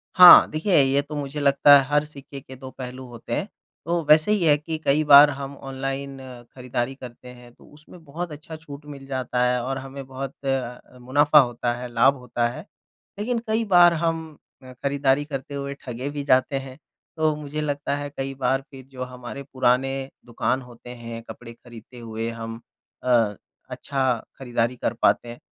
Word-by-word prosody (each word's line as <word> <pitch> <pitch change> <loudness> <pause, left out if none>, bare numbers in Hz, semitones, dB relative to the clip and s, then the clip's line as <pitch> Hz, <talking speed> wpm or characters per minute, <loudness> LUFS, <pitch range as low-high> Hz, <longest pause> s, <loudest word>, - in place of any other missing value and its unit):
हाँ, 180 -1 +10
देखिए 155 +1 +3
ये 135 +1 +2
तो 145 +1 -9
मुझे 145 0 -4
लगता 145 0 +6
है - - 0
हर 145 0 +2
सिक्के 140 -2 -10
के 130 -1 -13
दो 130 0 -10
पहलू 130 0 -7
होते 120 -1 -8
हैं, 195 - -2 0.4
तो 170 0 -1
वैसे 155 +7 +5
ही 210 -4 +1
है 150 -2 +5
कि 160 +2 -5
कई 145 +3 +3
बार 145 +1 +10
हम 140 0 -6
ऑनलाइन 135 0 -5 0.4
खरीदारी 125 0 -3
करते 125 -1 -12
हैं 120 -1 -16
तो - - -21
उसमें 155 +3 -16
बहुत 165 +4 -6
अच्छा 150 +2 -9
छूट 150 -2 -11
मिल 140 -2 -10
जाता 130 -2 -1
है 125 0 +1
और 135 +2 -3
हमें 135 0 -8
बहुत 135 0 -6
अ, 125 -2 -4
मुनाफ़ा 145 +4 +4
होता 120 -2 0
है, 125 +1 -6
लाभ 130 +4 +4
होता 120 -2 -2
है, 150 +8 -9 0.5
लेकिन 235 +3 -1
कई 220 +1 +1
बार 175 -3 +6
हम 160 -2 -2 0.3
अ, 130 0 -12
खरीदारी 140 +2 0
करते 140 -1 -6
हुए 140 0 -4
ठगे 125 +2 -5
भी 145 0 -5
जाते 130 0 +2
हैं। 130 0 -12 0.4
तो 155 -1 +1
मुझे 150 0 -5
लगता 145 -1 -2
है 145 0 -5
कई 135 -1 -5
बार 135 0 0
फिर 135 -2 -12
जो 130 -1 -6
हमारे 125 +2 -8
पुराने 130 +1 +1 0.3
दुकान 120 +2 -1
होते 120 -1 -14
हैं 115 -1 -8
कपड़े 115 -1 -10
खरीदते 120 +1 -15
हुए 115 0 -5
हम 115 0 -7 0.4
अ, 115 -5 +2 0.3
अच्छा 130 -4 -2 0.2
खरीदारी 120 -2 -1
कर 120 - -2
पाते 120 - +2
हैं। 120 - -9
135 Hz, 185 wpm, -23 LUFS, 125-145 Hz, 0.5 s, हाँ